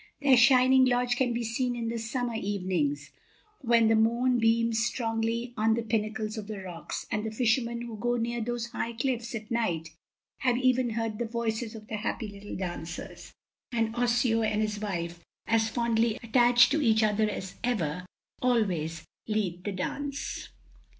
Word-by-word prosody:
Their 280 Hz, -2 st, +5 dB
shining 255 Hz, +1 st, +6 dB
lodge 245 Hz, -1 st, +2 dB
can 245 Hz, 0 st, +1 dB
be 235 Hz, 0 st, -1 dB
seen 245 Hz, +2 st, -1 dB
in 230 Hz, -1 st, -3 dB
the 230 Hz, 0 st, -3 dB
summer 240 Hz, +1 st, -2 dB
evenings, 180 Hz, -9 st, -1 dB, 0.5 s
when 235 Hz, -4 st, +4 dB
the 225 Hz, -, +4 dB
moon 235 Hz, +3 st, +3 dB
beams 225 Hz, 0 st, +2 dB
strongly 230 Hz, 0 st, -1 dB
on 220 Hz, +1 st, +2 dB
the 235 Hz, -, -2 dB
pinnacles 215 Hz, 0 st, -2 dB
of 205 Hz, -, -8 dB
the 215 Hz, -1 st, -5 dB
rocks; 180 Hz, -3 st, -6 dB
and 210 Hz, -1 st, -1 dB
the 220 Hz, -, -2 dB
fishermen 235 Hz, +1 st, 0 dB
who 235 Hz, -2 st, -6 dB
go 240 Hz, +3 st, 0 dB
near 235 Hz, 0 st, -2 dB
those 235 Hz, 0 st, -3 dB
high 235 Hz, -1 st, -3 dB
cliffs 235 Hz, -1 st, -2 dB
at 215 Hz, 0 st, -7 dB
night 175 Hz, -9 st, -1 dB, 0.5 s
have 250 Hz, -1 st, +2 dB
even 255 Hz, -1 st, +2 dB
heard 225 Hz, -1 st, -3 dB
the 235 Hz, -, -1 dB
voices 230 Hz, 0 st, -2 dB
of 215 Hz, -1 st, -10 dB
the 215 Hz, -, -4 dB
happy 220 Hz, +1 st, -3 dB
little 200 Hz, 0 st, -8 dB
dancers. 175 Hz, -2 st, -6 dB, 0.4 s
And 225 Hz, -1 st, 0 dB
Osseo 240 Hz, -1 st, +2 dB
and 215 Hz, -1 st, +1 dB
his 210 Hz, -1 st, -2 dB
wife, 170 Hz, -4 st, -4 dB, 0.2 s
as 225 Hz, 0 st, +2 dB
fondly 230 Hz, -1 st, +1 dB
attached 245 Hz, +2 st, +5 dB
to 310 Hz, +2 st, +2 dB
each 220 Hz, -4 st, +4 dB
other 215 Hz, 0 st, +2 dB
as 190 Hz, -2 st, -5 dB
ever, 180 Hz, -8 st, -1 dB, 0.3 s
always 180 Hz, -10 st, 0 dB, 0.2 s
lead 190 Hz, -5 st, -2 dB
the 205 Hz, -, -1 dB
dance. 280 Hz, +10 st, -4 dB
225 Hz, 170 wpm, -28 LUFS, 210-240 Hz, 0.5 s, shining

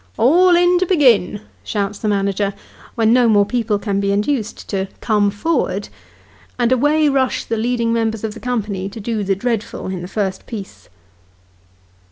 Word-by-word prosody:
" 95 Hz, -, -34 dB
All 350 Hz, +8 st, +5 dB
in 355 Hz, +1 st, +4 dB
to 370 Hz, -, 0 dB
begin," 235 Hz, -, +3 dB, 0.2 s
shouts 205 Hz, -1 st, -3 dB
the 215 Hz, -, -3 dB
manager, 200 Hz, 0 st, 0 dB, 0.4 s
when 225 Hz, -1 st, +3 dB
no 245 Hz, -2 st, +4 dB
more 205 Hz, -2 st, +4 dB
people 225 Hz, -2 st, 0 dB
can 200 Hz, -1 st, -2 dB
be 200 Hz, 0 st, 0 dB
induced 210 Hz, +3 st, -2 dB
to 195 Hz, -1 st, -2 dB
"come 210 Hz, -2 st, +2 dB
for'erd," 265 Hz, +12 st, -1 dB, 0.7 s
and 240 Hz, -1 st, +1 dB
away 295 Hz, +4 st, +3 dB
rush 270 Hz, -2 st, 0 dB
the 230 Hz, -, -2 dB
leading 230 Hz, 0 st, 0 dB
members 225 Hz, -2 st, -1 dB
of 220 Hz, -1 st, -3 dB
the -, -, -10 dB
company 210 Hz, -6 st, -3 dB
to 225 Hz, -, -9 dB
do 220 Hz, 0 st, -2 dB
the 195 Hz, 0 st, 0 dB
dreadful 225 Hz, +1 st, -3 dB
in 185 Hz, -2 st, -4 dB
the 180 Hz, -, -6 dB
first 190 Hz, -1 st, -3 dB
piece. 210 Hz, -5 st, -9 dB
220 Hz, 175 wpm, -19 LUFS, 200-250 Hz, 0.7 s, All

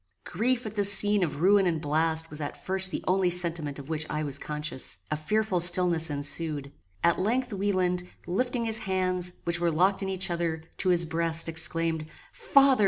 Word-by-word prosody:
Grief 245 Hz, +2 st, 0 dB
at 215 Hz, -, -5 dB
this 200 Hz, -2 st, +5 dB
scene 205 Hz, 0 st, +4 dB
of 150 Hz, -3 st, -4 dB
ruin 195 Hz, +1 st, +4 dB
and 165 Hz, -2 st, 0 dB
blast 160 Hz, +2 st, 0 dB
was 150 Hz, 0 st, -4 dB
at 145 Hz, -, -5 dB
first 190 Hz, 0 st, +2 dB
the -, -, -5 dB
only 185 Hz, 0 st, +2 dB
sentiment 170 Hz, -5 st, +1 dB
of 140 Hz, -1 st, -10 dB
which 155 Hz, -1 st, -3 dB
I 155 Hz, 0 st, -2 dB
was 140 Hz, -2 st, -3 dB
conscious. 150 Hz, -7 st, -3 dB
A -, -, +1 dB
fearful 190 Hz, +5 st, -1 dB
stillness 175 Hz, -2 st, +4 dB
ensued. 145 Hz, 0 st, -4 dB, 0.3 s
At 170 Hz, -, +2 dB
length 235 Hz, +5 st, -1 dB
Wieland, 185 Hz, -2 st, -1 dB, 0.2 s
lifting 235 Hz, +6 st, -1 dB
his 225 Hz, 0 st, 0 dB
hands, 185 Hz, -3 st, -1 dB
which 170 Hz, 0 st, -1 dB
were 170 Hz, 0 st, +1 dB
locked 185 Hz, +5 st, +1 dB
in 195 Hz, -, -3 dB
each 185 Hz, -2 st, -2 dB
other, 165 Hz, -2 st, -2 dB
to 185 Hz, -, 0 dB
his 175 Hz, -1 st, +2 dB
breast, 165 Hz, 0 st, 0 dB
exclaimed, 165 Hz, -1 st, 0 dB, 0.3 s
"Father! 275 Hz, -2 st, +3 dB
175 Hz, 185 wpm, -27 LUFS, 160-195 Hz, 0.3 s, this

